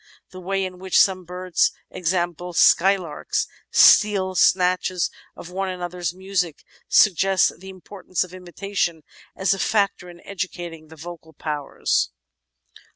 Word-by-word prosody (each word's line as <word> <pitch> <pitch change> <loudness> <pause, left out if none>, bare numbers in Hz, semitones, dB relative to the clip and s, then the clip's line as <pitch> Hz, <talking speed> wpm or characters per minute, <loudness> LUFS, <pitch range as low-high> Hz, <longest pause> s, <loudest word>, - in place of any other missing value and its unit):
The 185 - -10
way 195 +1 -1
in 185 -1 -8
which 190 0 +2
some 185 -2 +3
birds, 180 0 0 0.2
e.g., 180 - -5 0.5
skylarks, 180 -3 +2 0.2
steal 195 -3 +5
snatches 185 -1 +2 0.2
of 175 - -11
one 190 +1 -2
another's 175 -2 -4
music, 185 -3 -3 0.3
suggests 195 -1 +4
the 190 +1 -12
importance 185 0 -4
of 180 0 -12
imitation 180 -2 -3 0.3
as 190 +1 +1
a 195 - -5
factor 200 -4 0
in 175 0 -13
educating 175 -4 -6
the 160 - -14
vocal 160 0 -11
powers. 145 - -1
185 Hz, 125 wpm, -22 LUFS, 175-190 Hz, 0.5 s, steal